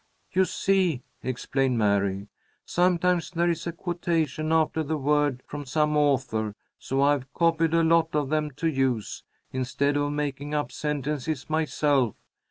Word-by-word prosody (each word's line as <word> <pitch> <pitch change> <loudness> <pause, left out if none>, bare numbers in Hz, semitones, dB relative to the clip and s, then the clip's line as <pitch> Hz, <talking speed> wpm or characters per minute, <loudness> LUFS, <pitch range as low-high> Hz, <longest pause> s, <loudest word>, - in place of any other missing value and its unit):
"You 190 0 +3
see," 185 -9 +1 0.2
explained 130 0 -1
Mary, 100 -2 +1 0.4
"sometimes 180 -1 +2
there 170 -1 +1
is 165 0 -4
a - - -1
quotation 165 -3 -1
after 160 0 +2
the 155 +1 -2
word 145 -2 +1
from 145 -1 -7
some 150 +2 +1
author, 130 -8 +1 0.2
so 135 +1 0
I've 140 -2 +1
copied 165 -1 +2
a 165 - +4
lot 165 -1 +3
of 145 -3 0
them 155 0 0
to 165 - -1
use, 130 -7 -1 0.3
instead 140 +3 0
of 145 0 0
making 145 0 -3
up 150 - -1
sentences 150 0 -3
myself. 145 -6 +1
150 Hz, 145 wpm, -26 LUFS, 135-165 Hz, 0.4 s, a